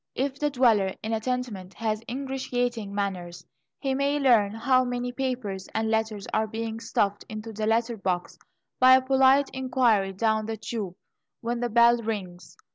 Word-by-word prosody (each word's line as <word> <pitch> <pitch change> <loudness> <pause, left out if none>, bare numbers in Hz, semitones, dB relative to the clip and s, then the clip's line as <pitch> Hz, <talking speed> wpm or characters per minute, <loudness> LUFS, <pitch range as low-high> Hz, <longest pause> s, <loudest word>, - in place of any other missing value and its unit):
If 270 +1 -2
the 295 - +1
dweller 230 -8 +3
in 220 +1 -2
a 220 - +1
tenement 220 -6 -4
has 215 -1 -2
ingratiating 245 -4 -2
manners, 185 -4 -4 0.3
he 270 -2 -1
may 280 +2 +1
learn 235 -8 +4
how 255 +3 +3
many 245 0 -3
papers, 245 -7 -3
and 220 0 0
letters 220 -2 -1
are 220 0 +1
being 225 +1 -4
stuffed 205 -3 -1
into 220 +1 -7
the 215 +1 -2
letter 230 +1 +1
box, 180 -3 -3 0.4
by 255 0 +8
a 260 - +4
polite 270 +1 +4
inquiry 245 -7 +1
down 220 +2 0
the 225 0 -3
tube 210 -4 -5 0.5
when 235 +1 -2
the 240 0 -1
bell 235 +1 +5
rings. 190 -6 -6
225 Hz, 165 wpm, -26 LUFS, 210-255 Hz, 0.5 s, by